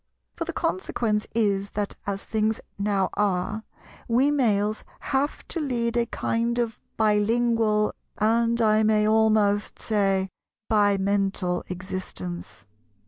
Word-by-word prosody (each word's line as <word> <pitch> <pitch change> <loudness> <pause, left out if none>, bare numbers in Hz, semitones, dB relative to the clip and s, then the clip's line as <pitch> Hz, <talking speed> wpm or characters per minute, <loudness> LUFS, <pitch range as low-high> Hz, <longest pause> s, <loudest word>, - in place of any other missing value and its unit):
For - - -3
the - - -3
consequence 220 - -1
is 200 -3 +1
that, 205 -1 -1
as 200 -1 -2
things 220 0 0 0.2
now 200 -2 +1
are, 205 +2 0 0.4
we 255 +5 +3
Males 215 -6 +1 0.3
have 280 +2 0
to 340 - -2
lead 240 -5 -1
a 235 -1 +2
kind 235 +1 -1
of 230 -2 -1 0.2
bi 215 -1 +3
lingual, 225 -1 +2 0.2
and 230 +2 +2
I 215 -1 +4
may 215 -1 +3
almost 215 -2 +3
say 195 -3 +1 0.4
bimental, 195 -3 +2
existence. 110 - -6
215 Hz, 120 wpm, -25 LUFS, 200-230 Hz, 0.4 s, I